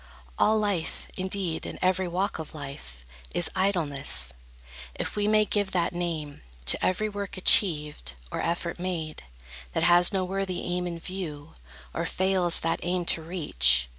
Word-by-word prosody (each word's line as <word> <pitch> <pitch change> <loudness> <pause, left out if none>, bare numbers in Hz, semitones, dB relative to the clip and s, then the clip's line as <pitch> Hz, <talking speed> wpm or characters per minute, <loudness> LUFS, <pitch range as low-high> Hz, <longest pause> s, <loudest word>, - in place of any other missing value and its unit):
All 220 +1 +4
life, 200 -6 -2
indeed, 185 -3 -2
in - - -6
every 185 0 +1
walk 185 +3 -1
of 160 0 -7
life, 140 - -9 0.3
Is 175 - +1
idleness, 145 - -1 0.6
if - - -4
we 205 0 0
may 215 0 +4
give 205 -2 -1
that 175 -1 +1
name 165 -4 -4 0.2
To 65 - +4
every 185 +4 +1
work 200 -2 -5
achieved, 150 - +4 0.2
or - - -2
effort 170 0 -2
made, 170 -4 -4 0.5
That 165 - +1
has 175 +1 +7
no 190 -2 0
worthy 190 -1 -2
aim 180 0 -2
in 170 -1 -4
view, 165 -4 -6 0.4
or - - -2
fails 185 -2 +2
That 165 0 0
aim 175 0 -1
to 165 - -5
reach. 65 - +4
175 Hz, 155 wpm, -27 LUFS, 155-190 Hz, 0.6 s, has